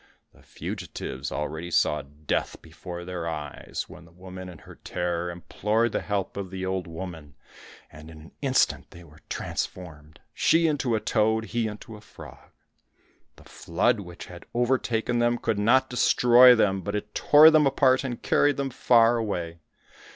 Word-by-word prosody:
The - - -21
fugitives 65 +2 -7
already 80 +4 -4
saw 75 -2 +1
death 75 +2 -4
before 85 +1 -9
their 90 -2 -5
eyes, 75 -3 -6
when 90 - -13
the 85 - -19
woman 95 +1 -10
in 90 - -11
her - - -14
terror 90 0 -3
implored 105 +6 -1
the - - -2
help 100 -2 -3
of 100 -2 -5
the 95 0 -5
old 95 -1 -3
woman, 80 -3 -9 0.6
and 80 0 -13
in 80 - -12
an 80 +1 -14
instant 135 -2 +1
they 85 - -14
were 80 -1 -18
transformed, 75 -5 -6
she 165 +1 +3
into 140 -7 0
a - - 0
toad, 110 0 +1
he 115 -1 0
into 110 +1 -9
a 105 - -13
frog. 105 - -14 0.9
The - - -18
flood 85 +6 -1
which 90 -3 -9
had 85 -1 -12
overtaken 120 -1 0
them 120 0 +2
could 115 -3 -2
not 130 +5 +3
destroy 125 0 +6
them, 95 -4 +1
but 100 +2 -4
it 105 0 -5
tore 155 +2 +7
them 155 -2 +4
apart 130 -1 +3
and 125 -3 -4
carried 145 0 +2
them 135 -1 -2
far 120 -1 +4
away. 85 -7 -4
95 Hz, 165 wpm, -26 LUFS, 85-120 Hz, 0.9 s, tore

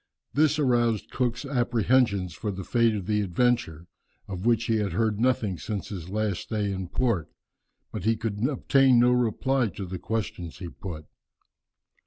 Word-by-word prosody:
This 150 0 +3
aroused 120 -6 +1
Cook's 120 +1 -1
apprehensions 120 - +1
for 105 - -4
the 95 -1 -4
fate 115 +2 +2
of 100 -3 -4
the 105 +1 +1
Adventure, 100 -4 0 0.4
of 95 +2 -4
which 115 -1 +3
he 115 -1 +1
had 105 -2 -1
heard 110 -2 0
nothing 115 -7 +1
since 105 -3 -4
his 90 -4 -6
last 105 -2 -1
stay 105 -3 -2
in 95 -1 -3
this - - -12
port, 115 -11 0 0.6
but - - -5
he 110 +2 +2
could 105 -1 -3
obtain 135 -2 +4
no 125 +1 +5
reply 125 +1 +1
to 100 -1 -6
the 90 0 -6
questions 95 -5 -4
he 90 -2 -6
put. 85 -4 -8
110 Hz, 170 wpm, -26 LUFS, 95-120 Hz, 0.6 s, no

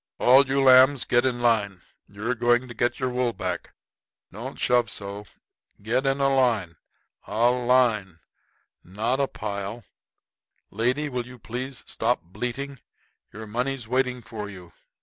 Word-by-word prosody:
"All 135 +3 +6
you 135 +1 +1
lambs 130 +1 +6
get 120 +1 +3
in 120 -1 -2
line. 105 -6 +1 0.2
You're 105 +5 -3
going 120 +1 +2
to 120 - -9
get 120 +1 -1
your 130 -1 -1
wool 125 -1 0
back. 90 -4 -4 0.6
Don't - - -7
shove 120 -2 +2
so. 100 0 -6 0.5
Get 125 +6 -1
in 135 +1 +1
a 135 0 +2
line 110 -11 +1 0.5
a 115 +4 +3
line 120 -7 +2 0.7
not 110 +8 -2
in 140 - +3
a - - -9
pile. 105 +1 -5 0.9
Lady, 125 +8 0
will 125 -3 -4
you 125 0 -12
please 125 +2 -6
stop 120 +2 -1
bleating? 125 +9 -5 0.5
Your 110 +1 -8
money's 125 +2 -3
waiting 125 0 0
for 110 -2 -7
you. 90 -4 -12
120 Hz, 150 wpm, -25 LUFS, 105-130 Hz, 0.9 s, All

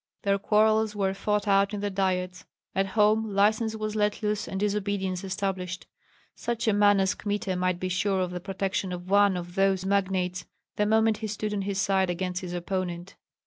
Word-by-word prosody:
Their 200 -1 +2
quarrels 215 +1 +3
were 195 -2 0
fought 210 +1 -1
out 200 +1 +3
in - - -4
the 205 0 -2
diets; 185 -1 -1 0.3
at 195 0 +1
home 215 +2 +3
license 220 +2 +2
was 215 0 -3
let 210 +1 0
loose 210 0 -1
and 190 - -4
disobedience 200 -2 -1
established. 190 -1 -3 0.5
Such 235 -1 -3
a 220 - +4
man 205 -1 +5
as 190 +1 +2
Kmita 205 -2 -2
might 180 -1 0
be 185 - -2
sure 190 +1 0
of 180 -1 -2
the 180 - -4
protection 195 0 -2
of 180 +1 -7
one 200 -2 +5
of 175 0 -7
those 195 0 +2
magnates 185 -2 0 0.3
the 210 - +1
moment 220 0 +3
he 220 - -4
stood 210 0 -3
on 205 - -1
his 195 0 -2
side 190 -1 +2
against 180 +1 -2
his 180 -1 -6
opponent. 175 0 -4
195 Hz, 190 wpm, -27 LUFS, 185-210 Hz, 0.5 s, man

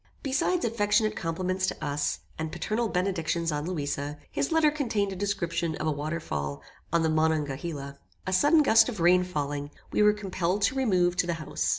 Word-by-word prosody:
Besides 295 +6 +1
affectionate 215 -1 +2
compliments 185 +3 -1
to - - -2
us, 145 0 -1 0.2
and 160 0 -3
paternal 225 +1 -1
benedictions 175 -3 0
on 150 +1 -2
Louisa, 145 -3 -3
his 280 - -1
letter 320 -2 +4
contained 225 -9 -1
a - - -6
description 170 -4 -1
of - - -4
a 155 - +2
waterfall 110 - -3 0.3
on 170 0 +2
the 160 - +2
Monongahela. 150 -2 -1 0.3
A 190 - -2
sudden 295 - +5
gust 225 -2 +5
of 215 -6 -6
rain 180 +2 +5
falling, 145 -4 -3 0.2
we - - +2
were 210 0 +6
compelled 195 -1 -2
to 285 - +3
remove 185 -10 +2
to 180 - +2
the 170 - 0
house. 155 -2 -2
175 Hz, 180 wpm, -28 LUFS, 155-210 Hz, 0.3 s, were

